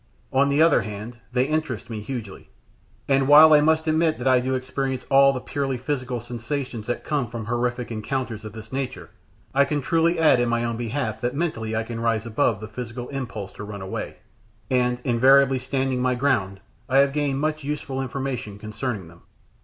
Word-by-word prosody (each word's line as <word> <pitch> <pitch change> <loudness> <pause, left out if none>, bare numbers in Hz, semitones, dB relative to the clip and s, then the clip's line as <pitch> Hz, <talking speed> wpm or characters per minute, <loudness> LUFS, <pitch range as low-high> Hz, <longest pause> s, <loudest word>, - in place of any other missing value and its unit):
On 140 +1 +4
the 145 +3 +4
other 165 -2 +5
hand, 110 +3 -7
they 125 0 +2
interest 150 -6 -2
me 110 -3 -5
hugely; 110 -4 -7 0.6
and 135 -1 +3
while 155 +2 +9
I 150 - +7
must 160 +1 +2
admit 160 0 +2
that 125 - -3
I 130 -1 +5
do 130 +1 -1
experience 130 0 -3
all 135 0 +7
the 130 - -3
purely 135 0 -2
physical 130 -2 -3
sensations 120 0 -5
that 120 - -2
come 145 -5 -1
from 115 -2 -6
horrific 120 +1 -2
encounters 115 0 -3
of 110 - -8
this 110 +1 -10
nature, 130 -1 -4 0.4
I 140 +1 +5
can 145 +1 -1
truly 165 +4 +2
add 155 -6 +5
in 120 -1 +1
my 120 0 0
own 115 -1 -1
behalf 120 +4 -3
that 125 +2 -1
mentally 110 -9 -2
I 110 - 0
can 115 0 -6
rise 115 -1 0
above 115 -2 0
the 110 - -6
physical 120 +2 -7
impulse 115 -8 -5
to - - -9
run 100 -2 -7
away, 95 - -5 0.6
and, 125 -1 +2
invariably 135 +2 +5
standing 130 0 -1
my 125 0 +1
ground, 100 -8 0 0.3
I 130 - +3
have 140 0 +4
gained 145 -2 0
much 155 0 -1
useful 140 -2 -3
information 130 -5 -4
concerning 110 -2 -4
them. 85 +1 -17
125 Hz, 195 wpm, -24 LUFS, 115-140 Hz, 0.6 s, while